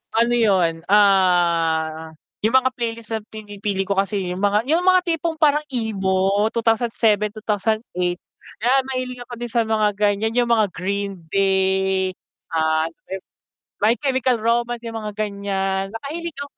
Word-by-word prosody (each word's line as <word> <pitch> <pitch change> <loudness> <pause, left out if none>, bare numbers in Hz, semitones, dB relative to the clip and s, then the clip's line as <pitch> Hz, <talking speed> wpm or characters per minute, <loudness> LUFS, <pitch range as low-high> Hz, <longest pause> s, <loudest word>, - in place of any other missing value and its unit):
ano 235 +1 +3
'yun, 190 -8 +3
ah, 170 -5 +2 0.2
'yung 220 +4 +1
mga 260 0 +4
playlist 230 -2 -5
na 220 - 0
pinipili 205 -2 -4
ko 200 +1 -2
kasi 195 -2 -1
'yung 180 - -4
mga 205 +2 +2
'yung 330 - +4
mga 370 0 +5
tipong 330 -2 -1
parang 300 -1 +3
emo, 200 -5 0
2007, 225 -2 +2
2008, 205 -4 -1 0.4
'yan 265 +3 +4
mahilig 255 -1 -4
ako 245 - -9
din 240 0 -6
sa 230 0 +2
mga 215 -1 +2
ganiyan, 210 +2 +1
'yung 240 -1 +1
mga 220 -3 +4
Green 195 +1 -3
Day, 190 0 +1 0.4
ah, 160 0 +2 0.9
My 215 +3 +3
Chemical 260 -4 0
Romance 235 +1 0
'yung 230 -1 -5
mga 210 -1 -6
ganiyan, 200 -1 -2
nakahiligan 285 +2 -6
210 Hz, 140 wpm, -21 LUFS, 190-235 Hz, 0.9 s, mga